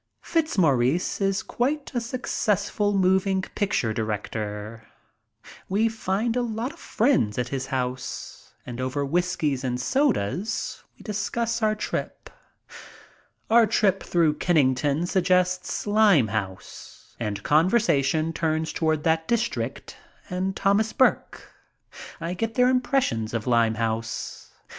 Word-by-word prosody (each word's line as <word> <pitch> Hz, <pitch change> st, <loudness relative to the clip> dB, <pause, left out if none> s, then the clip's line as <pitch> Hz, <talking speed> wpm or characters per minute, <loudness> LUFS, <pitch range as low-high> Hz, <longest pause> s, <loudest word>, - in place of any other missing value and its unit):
Fitzmaurice 170 Hz, -, +1 dB
is 195 Hz, 0 st, +1 dB
quite 280 Hz, +4 st, -2 dB
a 240 Hz, -, 0 dB
successful 210 Hz, -4 st, -1 dB
moving 190 Hz, 0 st, +2 dB
picture 190 Hz, -, 0 dB
director. 110 Hz, 0 st, -4 dB, 0.8 s
We 215 Hz, +4 st, +2 dB
find 220 Hz, +1 st, -1 dB
a 250 Hz, -, +1 dB
lot 235 Hz, +4 st, -3 dB
of 340 Hz, -, -18 dB
friends 220 Hz, -, +1 dB
at 125 Hz, -1 st, -1 dB
his 135 Hz, -1 st, -3 dB
house, 125 Hz, -1 st, -5 dB
and 120 Hz, 0 st, -6 dB
over 130 Hz, +2 st, -1 dB
whiskies 155 Hz, -4 st, 0 dB
and 125 Hz, -1 st, -2 dB
sodas 215 Hz, -, -1 dB
we -, -, -15 dB
discuss 230 Hz, +3 st, -2 dB
our 215 Hz, 0 st, +2 dB
trip. 215 Hz, -, -5 dB, 1.2 s
Our 230 Hz, 0 st, +5 dB
trip 200 Hz, -3 st, +2 dB
through 165 Hz, -4 st, +1 dB
Kennington 145 Hz, -1 st, +2 dB
suggests 180 Hz, 0 st, +1 dB
Limehouse 130 Hz, -, 0 dB
and 105 Hz, -3 st, -3 dB
conversation 160 Hz, -, +2 dB
turns 160 Hz, -1 st, -1 dB
toward 155 Hz, -2 st, 0 dB
that 160 Hz, 0 st, +1 dB
dis 235 Hz, 0 st, +2 dB
trict -, -, -5 dB, 0.4 s
and 190 Hz, +1 st, -1 dB
Thomas 205 Hz, +3 st, +2 dB
Burke. 260 Hz, -, +1 dB, 0.7 s
I 165 Hz, +1 st, -3 dB
get 225 Hz, +4 st, -3 dB
their 250 Hz, 0 st, +4 dB
impressions 250 Hz, -, 0 dB
of 110 Hz, -, -2 dB
Limehouse. 115 Hz, -2 st, -1 dB
180 Hz, 115 wpm, -25 LUFS, 130-215 Hz, 1.2 s, Our